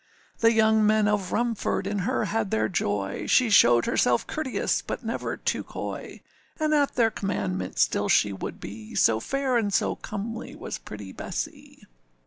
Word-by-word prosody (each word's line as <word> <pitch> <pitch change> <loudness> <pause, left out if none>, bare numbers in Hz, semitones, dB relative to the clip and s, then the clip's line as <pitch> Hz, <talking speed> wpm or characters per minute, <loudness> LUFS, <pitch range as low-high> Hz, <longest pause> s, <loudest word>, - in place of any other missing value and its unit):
The 230 0 +5
young 220 -1 +4
men 215 0 +3
of 205 -3 0
Rumford 235 -4 -1
in 200 +1 -2
her 225 +3 0
had 215 0 -1
their 110 -7 +1
joy, 100 -2 -2
She 245 -3 +4
showed 120 - +6
herself 120 -1 +2
courteous, 310 -5 -1
but - - -5
never - - -3
too - - -2
coy, - - -7 0.4
And 310 0 +1
at 290 -2 +2
their 230 -2 +3
commandment 95 - -3
still - - +2
she 100 -1 +3
would 95 - -6
be, 105 +2 -9
So 110 -1 +4
fair 270 - 0
and 210 -3 0
so - - +1
comely 225 +3 -6
was - - -6
pretty 105 -2 -9
Bessee. - - -6
210 Hz, 165 wpm, -26 LUFS, -, 0.4 s, showed